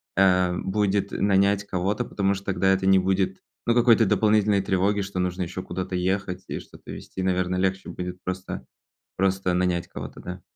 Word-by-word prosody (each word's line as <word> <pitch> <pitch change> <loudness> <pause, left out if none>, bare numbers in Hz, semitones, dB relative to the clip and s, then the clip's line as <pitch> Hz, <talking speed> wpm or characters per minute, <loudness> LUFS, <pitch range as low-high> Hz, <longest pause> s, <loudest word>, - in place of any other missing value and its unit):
эм, 90 -1 +3
будет 100 0 +1
нанять 100 0 +2
кого-то, 95 +2 -1
потому 100 0 0
что 95 0 -9
тогда 95 0 +2
это 95 0 +1
не 95 0 +6
будет, 95 0 0 0.3
ну, 115 - +3
какой-то 115 -2 +5
дополнительной 105 -1 +3
тревоги, 95 +2 +1
что 95 -1 -5
нужно 90 0 -1
ещё 90 +1 -4
куда-то 90 +1 -4
ехать 95 0 -1
и - - -3
что-то - - -13
везти. 95 - -6
Наверное, 90 0 0
легче 95 0 -1
будет 90 0 -6
просто 90 +1 -5 0.5
просто 95 -1 +1
нанять 90 -1 0
кого-то, - - -8
да? 90 0 -7
95 Hz, 170 wpm, -25 LUFS, 90-100 Hz, 0.5 s, не